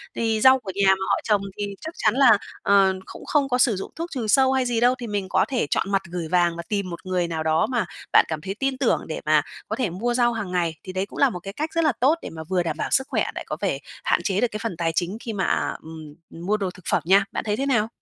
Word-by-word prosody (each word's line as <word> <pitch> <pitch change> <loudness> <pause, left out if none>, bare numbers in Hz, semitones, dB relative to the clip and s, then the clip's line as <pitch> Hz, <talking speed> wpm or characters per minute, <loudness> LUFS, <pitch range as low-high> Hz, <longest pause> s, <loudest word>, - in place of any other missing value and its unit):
thì 225 -1 0
rau 260 +2 +7
của 195 -5 -6
nhà 200 -1 +2
mà 190 0 +2
họ - - +3
trồng 210 -2 +2 0.2
thì 205 - -2 0.2
chắc 320 - -6
chắn 215 - +2
là, 250 -6 +6 0.2
ờ, 195 -1 +4
cũng - - -11
không 280 -2 +1
có 250 - +2
sử 245 -4 +3
dụng 190 - -6
thuốc 335 +2 -4
trừ 245 -6 -3
sâu 265 +4 +4
hay 260 -1 +1
gì 240 -2 0
đâu, 245 +2 +4
thì 240 - -6
mình 200 -3 -3
có - - +3
thể 250 - -1
chọn 195 - 0
mặt 195 -1 +2
gửi 175 -2 -3
vàng 175 0 +2
và 170 - -5
tìm 200 -3 -1
một 170 +1 -8
người 180 -2 0
nào 160 -2 -3
đó 160 +4 +2
mà 240 -7 0 0.3
bạn - - +7
cảm 155 -2 -4
thấy 195 +4 -5
tin 270 -1 0
tưởng 260 -3 +1
để 160 - -5
mà 155 0 +4 0.3
có 220 - -2
thể 240 -4 -1
mua 220 +8 -2
rau 240 -1 +2
hàng 210 -5 -4
ngày. 170 -3 0
Thì 185 - -7
đấy 190 +1 -1
cũng - - -10
là 280 - +5
một 180 - -6
cái 195 +3 -8
cách 310 +7 -3
rất 330 0 +1
là 305 - +4
tốt 275 +6 +4
để - - -6
mà 160 0 -8
vừa 180 +2 0
đảm 160 -2 -3
bảo - - -2
sức 265 +1 +2
khỏe - - 0
lại - - -4
có - - -3
thể - - 0 0.2
hạn - - +2
chế 195 -1 0
được 245 - +3
cái 215 - -4
phần 225 -7 -3
tài 165 -1 0
chính 185 +4 -1
khi 230 -2 -5
mà, 190 - -1
à, - - 0
ừm, 155 -2 -10 0.3
mua 210 +3 +2
đồ 195 -3 -2
thực 185 -2 -17
phẩm - - +2
nha. 195 +3 +5
Bạn - - -3
thấy 210 -1 -1
thế 275 - -1
nào? 235 -6 +2
200 Hz, 305 wpm, -24 LUFS, 180-245 Hz, 0.3 s, rau